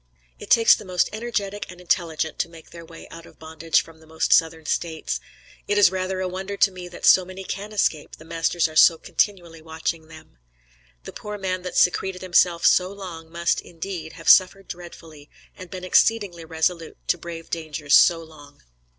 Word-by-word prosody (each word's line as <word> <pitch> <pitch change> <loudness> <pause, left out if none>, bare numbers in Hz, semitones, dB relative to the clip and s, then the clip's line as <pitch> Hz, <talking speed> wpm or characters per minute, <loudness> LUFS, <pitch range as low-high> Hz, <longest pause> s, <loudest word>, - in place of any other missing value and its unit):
It - - -11
takes 230 -1 +6
the - - -3
most 185 -2 0
energetic 210 -3 -4
and 180 - -11
intelligent 165 -3 -1
to - - -1
make 165 -1 -15
their 170 -1 -11
way 165 0 -13
out 165 0 -12
of - - -19
bondage 160 0 0
from 165 -1 -16
the 160 - -19
most 160 0 +1
Southern 160 -1 +2
States. 160 0 -2 0.5
It 205 - 0
is 205 -3 +6
rather 185 0 -3
a 185 - -1
wonder 190 +2 -5
to 200 - +4
me 180 -1 -9
that 175 - -7
so 185 - +7
many 185 +1 -9
can 200 +3 -6
escape, 170 -7 -1
the 155 - -16
masters 165 +1 0
are 155 - -12
so 165 +2 +7
continually 170 -3 -2
watching 160 0 -4
them. 155 - -16 0.6
The - - -10
poor 210 0 -7
man 185 -2 -3
that 180 0 -5
secreted 185 +1 +1
himself 175 -1 +2
so 185 +1 +4
long, 175 -5 -9
must, 170 0 0
indeed, 170 -1 -7
have 165 -4 -12
suffered 190 +6 +5
dreadfully, 165 -4 -11 0.3
and 185 -1 -11
been 185 0 -8
exceedingly 185 -3 +2
resolute 160 +1 -2
to 175 - +2
brave 165 -1 -9
dangers 155 -3 -3
so 165 -1 +6
long. 145 -3 -16
170 Hz, 190 wpm, -23 LUFS, 160-185 Hz, 0.6 s, so